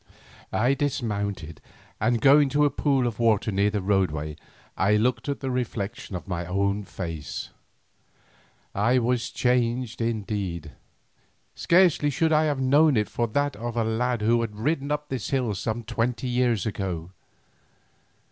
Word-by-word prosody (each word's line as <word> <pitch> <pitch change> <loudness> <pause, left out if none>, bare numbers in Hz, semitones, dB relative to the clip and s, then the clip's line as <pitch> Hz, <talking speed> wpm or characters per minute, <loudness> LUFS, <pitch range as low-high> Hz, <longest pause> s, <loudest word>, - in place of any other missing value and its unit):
I 125 +5 +2
dismounted, 100 - -3 0.4
and 115 +1 +1
going 140 +2 +6
to 145 +2 +3
a 145 - +2
pool 135 -2 +1
of 120 -1 -3
water 110 -2 +2
near 100 +1 +2
the 105 -2 -2
roadway 75 -7 0 0.4
I 100 +3 +3
looked 115 +4 0
at 140 - -3
the 135 -2 -2
reflection 110 -6 -4
of 90 - -6
my 90 -2 -3
own 100 +2 0
face. 80 -6 -6 1.2
I 115 +6 +2
was 125 0 0
changed 125 -1 0
indeed, 100 -8 -3 0.8
scarcely 170 -4 +3
should 160 +3 +1
I 155 +1 +4
have 145 -3 0
known 140 +1 +4
it 105 - 0
for 120 - -1
that 145 +5 0
of 120 +2 -5
the 115 - +1
lad 115 +1 -1
who 115 +2 +3
had 110 -3 -4
ridden 140 +5 -1
up 150 0 -2
this 130 -6 -3
hill 125 -6 0
some 110 +4 -3
twenty 120 +3 -2
years 120 -5 +1
ago. 95 -5 -4
115 Hz, 150 wpm, -25 LUFS, 100-130 Hz, 1.2 s, going